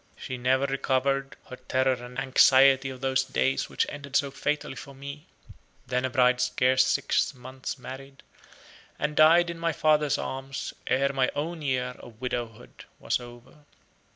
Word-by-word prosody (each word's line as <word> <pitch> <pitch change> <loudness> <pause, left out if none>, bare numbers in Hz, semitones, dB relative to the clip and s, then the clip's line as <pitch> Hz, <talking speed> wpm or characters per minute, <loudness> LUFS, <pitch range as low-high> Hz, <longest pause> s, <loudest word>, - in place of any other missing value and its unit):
She 130 - -6
never 130 +2 +1
recovered 135 0 0
her 130 - -8
terror 130 +1 +1
and 125 0 -9
anxiety 135 0 +5
of 130 -1 -9
those 135 0 +1
days 65 - -1
which - - 0
ended 140 -1 -8
so 140 -1 +2
fatally 150 +2 -2
for 140 -2 -10
me, 140 +2 -9 0.6
then 125 +1 -1
a - - -1
bride 125 0 +3
scarce 125 +1 +3
six - - +1
months 130 +2 -7
married, 135 +2 -10 0.7
and 150 0 -2
died 170 +3 +6
in 165 - -9
my 165 -1 0
father's 150 -2 +2
arms 135 +1 -5
ere 140 +2 +1
my 130 -1 +2
own 160 +3 -3
year 125 -3 -1
of 115 -2 -14
widowhood 120 -2 -6
was - - -1
over. 120 +2 -13
130 Hz, 155 wpm, -27 LUFS, 125-140 Hz, 0.7 s, died